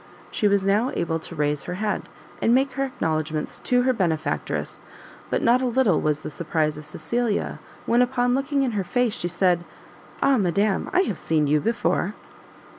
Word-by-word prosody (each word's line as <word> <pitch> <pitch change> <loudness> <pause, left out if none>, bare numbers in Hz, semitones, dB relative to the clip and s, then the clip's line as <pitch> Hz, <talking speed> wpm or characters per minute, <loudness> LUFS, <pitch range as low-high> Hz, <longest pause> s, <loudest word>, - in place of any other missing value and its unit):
She 210 - +1
was 200 -1 +2
now 210 +6 +2
able 165 -1 -1
to 170 - -9
raise 150 -1 0
her 180 - -4
head, 210 +1 -2 0.3
and 235 - +4
make 265 +1 +2
her 275 +2 -1
acknowledgments 155 - -2
to 245 0 +3
her 260 0 +3
benefactress; 170 -8 -2 0.5
but - - 0
not 240 +2 +4
a 255 - +1
little 235 -8 +2
was 150 0 0
the - - -5
surprise 155 -1 -1
of 150 - -10
Cecilia, 235 -3 -2 0.3
when, 240 +1 +3
upon 245 0 +2
looking 275 +1 +1
in 255 - 0
her 205 -3 -1
face, 240 +5 0
she 175 - -2
said, 175 0 +2 0.6
"Ah, 275 -2 +3
madam, 200 +2 +1
I 365 0 +4
have 210 - -2
seen 155 -2 +1
you 150 +1 +3
before!" 230 -2 0
205 Hz, 185 wpm, -24 LUFS, 165-245 Hz, 0.6 s, and